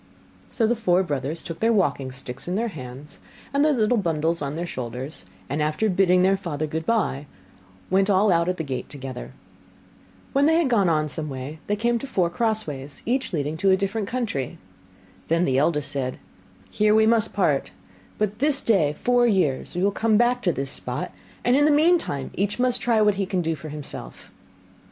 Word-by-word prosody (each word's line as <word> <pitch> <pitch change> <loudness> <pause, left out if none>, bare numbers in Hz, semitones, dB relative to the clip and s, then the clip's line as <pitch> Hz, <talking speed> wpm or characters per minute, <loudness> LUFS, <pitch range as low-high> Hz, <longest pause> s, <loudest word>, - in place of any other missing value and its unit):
So 230 - 0
the 235 +2 +2
four 190 -5 +2
brothers 145 -1 -3
took 165 -1 -7
their 225 +1 +3
walking 145 - +1
sticks 130 +1 -7
in 180 - -1
their 230 +3 0
hands, 135 -3 -9 0.3
and 280 +1 +3
their 305 - +4
little 235 -3 +2
bundles 165 -2 0
on 140 0 -3
their 170 +2 -3
shoulders, 125 - -6 0.2
and 145 +3 -2
after 155 +8 +1
bidding 180 -1 +4
their 190 +1 +4
father 155 -5 -3
goodbye, 155 -3 -1 0.6
went 195 +2 +3
all 200 +1 +4
out 170 0 +2
at 180 - -1
the 160 - -2
gate 135 -4 -5
together. 130 - -7 1.0
When 280 +1 +4
they 320 - +4
had 330 -5 +2
got 200 -6 +3
on 155 -2 +1
some 155 0 -4
way 135 +3 -6
they 205 - +1
came 235 +2 +1
to 275 - -6
four 180 -9 0
crossways, 170 - -2
each 260 +3 0
leading 150 -2 -2
to 195 +4 +2
a 190 - +5
different 200 +1 -2
country. 215 - -3 0.7
Then 165 +2 +2
the 130 0 +2
eldest 150 -1 +1
said, 130 -3 -2 0.5
'Here 210 0 +3
we 220 0 +5
must 225 -1 +3
part; 155 -9 +1 0.5
but 210 0 -1
this 285 0 +2
day 170 -10 +2
four 245 +8 +2
years 175 - +1
we 180 - 0
will 200 - +3
come 220 +1 +2
back 245 +2 +2
to 180 - +2
this 135 -3 -3
spot, - - -4 0.3
and 245 - +3
in 290 +1 +4
the - - +5
meantime 295 - +2
each 205 +2 -1
must 250 0 +2
try 230 -4 +3
what 205 -1 +2
he 195 - -1
can 185 -2 -1
do 165 0 0
for 155 0 -8
himself. 150 -1 -8
180 Hz, 195 wpm, -24 LUFS, 150-220 Hz, 1.0 s, a